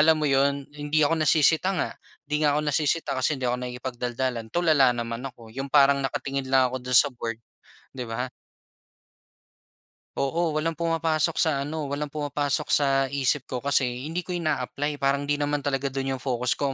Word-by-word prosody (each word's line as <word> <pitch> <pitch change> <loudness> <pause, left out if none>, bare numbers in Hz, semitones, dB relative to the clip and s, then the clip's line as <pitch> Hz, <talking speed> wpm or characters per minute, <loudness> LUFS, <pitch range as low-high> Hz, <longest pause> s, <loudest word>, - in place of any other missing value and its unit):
alam 160 +1 +6
mo 155 - -2
'yon? 140 0 +2
Hindi 150 +1 +1
ako 165 +2 +1
nasisita 160 +4 +3
nga. - - -1 0.3
'Di 150 +1 -1
nga 150 -1 +3
ako - - +2
nasisita 150 0 +1
kasi 135 +3 0
hindi 130 - -5
ako 125 0 +1
nakikipagdaldalan, 125 -1 -3
tulala 155 -5 +4
naman 115 0 -4
ako. 115 -3 -15
'Yong 135 +3 -5
parang 140 -1 +5
nakatingin 135 0 -3
lang 130 -1 +3
ako 130 - -3
do'n 125 0 +1
sa 140 +2 +5
board, 115 -2 -4 0.6
'di 125 - -3
ba? 125 +3 -3 1.9
Oo, 165 +5 0
walang 155 +2 -1
pumapasok 165 -1 0
sa 145 -4 +2
ano 150 +1 -4
walang 145 +1 -3
pumapasok 145 0 -1
sa 135 -1 +3
isip 140 0 +1
ko, 125 -1 -4
kasi 140 -2 +2 0.2
hindi 175 +2 -3
ko 180 - -3
ina-apply. 145 -2 -2
Parang 140 +1 +1
'di 145 0 -1
naman 145 0 -1
talaga 140 -1 -1
dun 135 0 -2
yung 130 - -2
focus 125 -1 -1
ko. 145 - 0
140 Hz, 180 wpm, -26 LUFS, 130-150 Hz, 1.9 s, alam